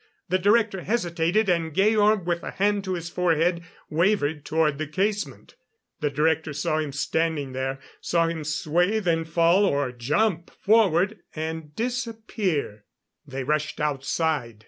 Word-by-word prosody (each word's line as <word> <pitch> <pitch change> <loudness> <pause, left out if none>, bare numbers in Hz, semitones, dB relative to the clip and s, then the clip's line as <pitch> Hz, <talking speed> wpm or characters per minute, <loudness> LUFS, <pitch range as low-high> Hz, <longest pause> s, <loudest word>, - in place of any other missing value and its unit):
The 185 +2 +2
Director 205 0 +2
hesitated, 180 -1 0
and 165 -4 0
Georg, 210 0 +3
with 170 -1 -1
a - - -5
hand 205 0 0
to 185 -1 -1
his 170 -1 -5
forehead, 170 0 +1 0.3
wavered 160 -3 +1
toward 155 -3 +1
the 155 - -2
casement. 200 +6 -2 0.5
The 150 - 0
Director 155 +1 0
saw 145 +2 -1
him 150 -2 -2
standing 150 0 -1
there; 130 +1 -3 0.2
saw 170 -1 +1
him 165 -2 -3
sway, 165 +7 +1
then 165 -5 0
fall 170 +4 +3
or 140 -8 +1
jump 160 - 0
forward, 205 -2 +2 0.2
and 160 -1 -5
disappear. 220 - -2 0.4
They 135 -1 -4
rushed 150 +2 -1
outside. 140 -4 -1
165 Hz, 140 wpm, -25 LUFS, 150-195 Hz, 0.5 s, Georg